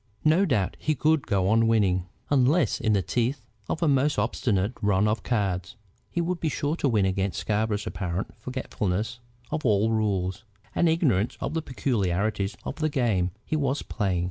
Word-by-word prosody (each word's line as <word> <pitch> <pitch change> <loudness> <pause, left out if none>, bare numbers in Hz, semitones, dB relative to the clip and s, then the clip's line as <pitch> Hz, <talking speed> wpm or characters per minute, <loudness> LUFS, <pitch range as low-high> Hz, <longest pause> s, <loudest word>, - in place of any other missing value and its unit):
No 165 +6 +5
doubt 105 - 0
he 155 - 0
could 150 +2 +2
go 95 -4 +1
on 115 +2 +4
winning. 95 -5 +2 0.2
Unless 145 +4 +3
in 110 -2 +2
the 100 -2 +2
teeth 125 +4 -1 0.3
of 165 - -1
a - - +3
most 145 +1 +2
obstinate 105 -2 0
run 105 -1 +3
of 110 +1 0
cards, 100 -3 -1 0.3
he 170 - -1
would 175 +1 -1
be 160 - 0
sure 145 +2 -1
to 140 - +1
win 105 -5 +3
against 95 0 -1
Scarborough's 105 0 -1
apparent 90 0 -3
forgetfulness 120 -3 -3 0.3
of 155 - -2
all 110 -1 +3
rules, 100 -4 0 0.3
and 170 - +3
ignorance 130 - +1
of - - -3
the 160 - 0
peculiarities 100 - -1
of - - -5
the 155 -1 0
game 110 -10 +1 0.2
he - - -1
was 140 -1 0
playing. 95 -5 -1
110 Hz, 175 wpm, -26 LUFS, 100-140 Hz, 0.3 s, No